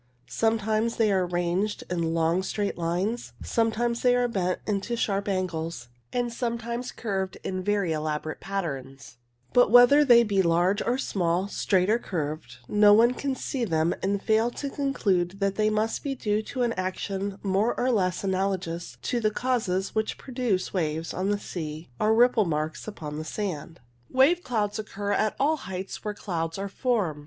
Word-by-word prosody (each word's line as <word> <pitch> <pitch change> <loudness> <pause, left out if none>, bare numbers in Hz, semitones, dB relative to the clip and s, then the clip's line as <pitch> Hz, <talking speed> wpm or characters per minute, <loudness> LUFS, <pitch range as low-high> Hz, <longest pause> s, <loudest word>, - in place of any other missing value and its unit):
Sometimes 220 0 0
they 220 -2 +2
are 185 -2 +2
ranged 175 +4 -1
in 170 -2 -1
long 165 +2 +2
straight 200 +2 -2
lines, 180 +8 -2
sometimes 235 +1 0
they 250 -1 +4
are 245 0 +2
bent 185 -5 -1
into 210 +3 -1
sharp 200 -3 -1
angles, 170 -8 -3 0.2
and 240 -1 -1
sometimes 235 +1 -3
curved 195 -4 -3
in 185 -1 -3
very 200 -3 +1
elaborate 155 0 -3
patterns; 135 -10 -5 0.4
but 245 -3 +5
whether 245 +6 +8
they 240 -4 +7
be 200 -3 +2
large 175 +3 +2
or 245 +2 0
small, 180 -6 0
straight 190 -2 +1
or 225 +3 +3
curved, 150 - -4
no 205 0 +6
one 235 +3 +5
can 270 +1 -2
see 260 -1 -3
them 165 -5 +1
and 195 +1 -1
fail 220 +1 +3
to 275 +3 -5
conclude 195 -11 0
that 195 -1 +1
they 215 +1 +2
must 215 +1 0
be 275 -1 -2
due 210 -4 0
to 250 +3 -3
an 235 -1 +1
action 190 +1 -3
more 200 +4 +1
or 255 +1 +2
less 185 -5 0
analogous 190 -3 -2
to 245 - 0
the 215 -2 +2
causes 215 -6 -1
which 220 0 -1
produce 245 -8 -2
waves 160 -3 -1
on 190 +2 -1
the 205 - +1
sea 155 -6 -6
or 215 - +3
ripple 235 -2 +4
marks 155 +1 -3
upon 150 -7 -6
the - - -4
sand. 170 -2 -5 0.3
Wave 285 +7 +4
clouds 215 - -1
occur 205 -1 -4
at 215 +1 +1
all 305 +3 +2
heights 190 -6 -6
where 210 -1 -3
clouds 165 -4 -3
are 195 +1 -4
formed. 200 - 0
200 Hz, 170 wpm, -26 LUFS, 175-230 Hz, 0.4 s, whether